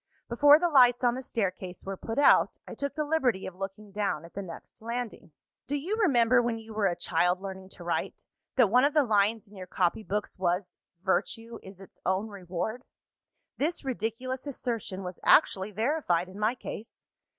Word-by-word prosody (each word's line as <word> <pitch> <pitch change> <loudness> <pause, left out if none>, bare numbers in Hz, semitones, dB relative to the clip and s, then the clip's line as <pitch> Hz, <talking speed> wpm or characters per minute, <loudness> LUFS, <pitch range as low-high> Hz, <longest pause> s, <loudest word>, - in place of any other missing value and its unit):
Before 290 +5 +7
the 350 +2 +1
lights 250 -6 +5
on 240 -1 +4
the 255 - -4
staircase 185 -6 -3
were 195 0 -3
put 225 +4 -6
out, 285 - +5
I - - -7
took 280 0 -4
the 305 - 0
liberty 270 -10 +1
of 190 - -6
looking 195 +2 -7
down 200 -6 -2
at 170 - -14
the 200 - -4
next 185 +4 -11
landing. 230 -6 -5 0.4
"Do 285 - -1
you 365 +9 -2
remember, 250 - +4
when 235 -1 -1
you 225 0 -10
were 210 -2 +2
a 175 - 0
child 175 +2 +1
learning 190 -1 -7
to 175 - -11
write, 170 0 -3 0.3
that 235 -7 +4
one 250 +2 +5
of 290 +2 +2
the 300 - +6
lines 215 -1 +2
in 205 - -17
your 185 -1 -8
copy 180 +3 0
books 210 -1 -4
was, 180 +1 -1 0.2
'Virtue 225 +4 -1
is 190 -1 -12
its 195 - -14
own 190 +4 0
reward'? 200 +5 -4 0.7
This 310 +1 -1
ridiculous 255 +2 -3
assertion 230 -8 -4
was 180 -1 -7
actually 190 +1 +4
verified 215 - 0
in 190 +2 -11
my 215 +4 +1
case! 225 -2 -9
220 Hz, 190 wpm, -29 LUFS, 190-250 Hz, 0.7 s, Before